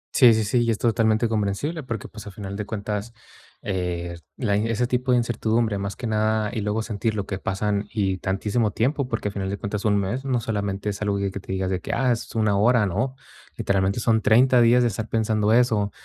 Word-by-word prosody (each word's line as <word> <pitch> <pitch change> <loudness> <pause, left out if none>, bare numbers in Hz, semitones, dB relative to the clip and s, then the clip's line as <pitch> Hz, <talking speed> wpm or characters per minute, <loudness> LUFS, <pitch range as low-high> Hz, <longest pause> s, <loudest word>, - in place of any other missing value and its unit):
Sí, 125 -3 +8
sí, 110 - +1
sí, 120 +4 +1
y 115 - +1
es 110 - +1
totalmente 115 0 +2
comprensible, 110 +9 -1
porque, 115 -5 -5
pues 105 -1 -11
a 105 - -7
final 100 -1 -7
de 105 0 -5
cuentas, 105 +2 -4 0.5
eh, 90 -3 -3 0.2
la 105 -6 0
y 110 +2 0
ese 115 +2 +1
tipo 125 +1 -1
de 125 - +5
incertidumbre, 115 -2 0
más 100 0 -4
que 125 - -7
nada 110 0 +1
y 110 - -2
luego 105 +2 -1
sentir 110 0 -2
lo 100 -2 -2
que 95 -1 -4
pasan 100 +1 -1
y 95 -3 0
tantísimo 105 +4 0
tiempo, 130 +6 0
porque 115 -4 -2
a - - -7
final 95 -1 -3
de 100 - -3
cuentas 100 +1 -4
un 105 -1 +3
mes, 100 +7 -2
no 130 -3 0
solamente 100 -2 -2
es 100 0 -5
algo 100 -1 0
que 100 -1 -1
te 95 - -9
digas 95 0 -1
de 95 - 0
que: - - -4
"Ah, 130 -2 +2
es 115 0 -3
1 105 -2 +2
hora", 110 +1 +4
no, 120 +8 -1 0.4
literalmente 100 +3 +1
son 110 -1 +2
30 125 +3 +5
días 120 +1 +5
de 120 - +3
estar 110 +1 -5
pensando 110 -1 +1
eso, 110 -4 +3
110 Hz, 230 wpm, -24 LUFS, 100-115 Hz, 0.5 s, Sí